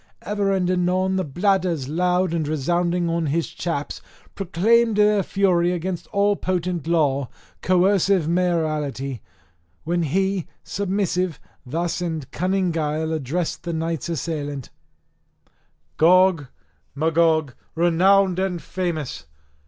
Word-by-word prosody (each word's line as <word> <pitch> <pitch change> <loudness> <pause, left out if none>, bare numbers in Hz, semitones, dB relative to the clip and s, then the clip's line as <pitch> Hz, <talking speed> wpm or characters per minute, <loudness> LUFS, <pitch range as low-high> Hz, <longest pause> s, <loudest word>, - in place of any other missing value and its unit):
Ever 205 -1 0
and 190 -2 +1
anon 185 +1 +1
the 185 - 0
bladders, 175 -2 0
loud 180 +3 +1
resounding 175 +4 0
on 165 -1 0
his 165 +3 0
chaps, 155 -5 -4 0.3
proclaimed 215 +5 +2
their 210 -1 +4
fury 180 -2 +1
against 180 0 -4
all 200 0 +2
potent 180 -4 -2
law, 140 -6 +1 0.3
coercive 185 -1 +3
mayoralty; 155 - -1 0.6
when 175 +1 0
he, 190 +3 0 0.2
submissive, 185 -4 -1 0.3
thus 170 +6 -2
in 160 -3 -3
cunning 185 +1 0
guile 160 0 -1
addressed 160 +3 -2
the 170 -1 -4
knights 165 -1 -3
assailant: 145 -4 -4 1.3
"Gog, 180 -3 +4 0.5
Magog, 160 -2 +2 0.2
renowned 180 +3 +3
and 190 -2 -1
famous! 160 - -4
175 Hz, 105 wpm, -22 LUFS, 160-185 Hz, 1.3 s, their